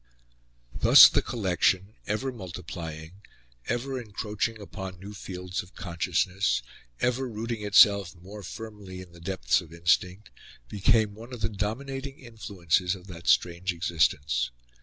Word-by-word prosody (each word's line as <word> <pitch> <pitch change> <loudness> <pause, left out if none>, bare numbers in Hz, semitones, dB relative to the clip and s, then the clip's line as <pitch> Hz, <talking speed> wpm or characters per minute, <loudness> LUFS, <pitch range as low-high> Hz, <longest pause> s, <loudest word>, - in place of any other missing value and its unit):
Thus - - +9
the - - +1
collection, 95 -2 0
ever 110 +6 -1
multiplying, 90 -4 -8 0.5
ever 125 +3 -2
encroaching 110 0 -3
upon 95 -3 -8
new 100 +3 -9
fields 90 -2 -5
of 90 - -17
consciousness, 90 -1 0 0.4
ever 125 +1 0
rooting 115 0 -4
itself 100 -2 +5
more 95 +4 -10
firmly 100 -1 -8
in 90 -2 -13
the 85 0 -15
depths 95 +1 +1
of 85 -3 -14
instinct, 90 +4 0 0.4
became 105 - +2
one 115 +4 -12
of 125 -3 -7
the - - +1
dominating 135 +7 -4
influences 95 - -1
of 90 -1 -13
that 85 -1 -10
strange 90 +2 +2
existence. 75 -7 +1
95 Hz, 130 wpm, -27 LUFS, 90-110 Hz, 0.5 s, Thus